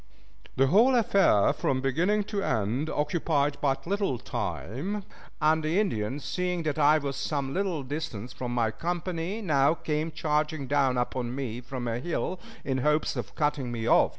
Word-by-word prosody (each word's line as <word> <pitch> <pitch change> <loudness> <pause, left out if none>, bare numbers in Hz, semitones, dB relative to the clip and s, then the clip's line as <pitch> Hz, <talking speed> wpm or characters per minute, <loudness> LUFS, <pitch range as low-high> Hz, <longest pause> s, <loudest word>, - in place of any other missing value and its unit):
The 135 - +4
whole 225 - +5
affair 200 - +4
from 130 - 0
beginning 170 +11 +1
to 200 0 -3
end 115 - 0
occupied 150 -2 0
but 135 -2 0
little 195 -7 0
time, 180 - -4 0.4
and 155 0 +3
the 160 +5 +1
Indians, 135 - -1
seeing 180 -2 -1
that 155 -1 -1
I 150 +1 +6
was 140 -2 -3
some 140 -3 -2
little 185 -6 -1
distance 130 -5 -5
from 125 -1 -4
my 115 -2 +1
company, 175 - -3
now 145 -3 +3
came 155 -1 -2
charging 150 -2 -1
down 135 -2 +2
upon 125 0 -2
me 125 -3 -4
from 125 0 -5
a 115 0 -1
hill, 175 +5 -2 0.3
in 130 -1 0
hopes 150 +3 +1
of - - -5
cutting 145 -4 0
me 115 -2 -3
off. - - +5
150 Hz, 165 wpm, -28 LUFS, 130-170 Hz, 0.4 s, I